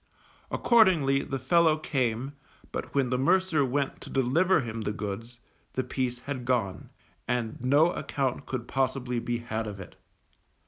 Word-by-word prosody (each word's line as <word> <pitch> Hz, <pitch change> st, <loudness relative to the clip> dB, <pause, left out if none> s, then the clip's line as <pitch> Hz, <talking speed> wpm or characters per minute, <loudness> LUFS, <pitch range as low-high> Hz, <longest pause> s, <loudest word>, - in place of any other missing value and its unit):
Accordingly 170 Hz, -, +4 dB
the 135 Hz, -3 st, -3 dB
fellow 160 Hz, +4 st, +3 dB
came, 130 Hz, -3 st, -1 dB, 0.4 s
but -, -, -5 dB
when 135 Hz, -3 st, +2 dB
the 125 Hz, -, +1 dB
mercer 170 Hz, +1 st, +3 dB
went 135 Hz, +1 st, -1 dB
to -, -, -10 dB
deliver 155 Hz, +8 st, +3 dB
him 115 Hz, -2 st, -5 dB
the 105 Hz, -, -1 dB
goods, 105 Hz, +3 st, -6 dB, 0.3 s
the 130 Hz, -, -1 dB
piece 125 Hz, -1 st, -2 dB
had 135 Hz, -2 st, -5 dB
gone, 120 Hz, -7 st, -1 dB, 0.4 s
and 120 Hz, -2 st, -2 dB
no 145 Hz, +6 st, +4 dB
account 135 Hz, -6 st, -2 dB
could 125 Hz, -3 st, -4 dB
possibly 130 Hz, -2 st, -1 dB
he 120 Hz, 0 st, -1 dB
had 115 Hz, -2 st, -4 dB
of 100 Hz, -2 st, -6 dB
it. 95 Hz, -, -10 dB
130 Hz, 150 wpm, -28 LUFS, 120-140 Hz, 0.4 s, Accordingly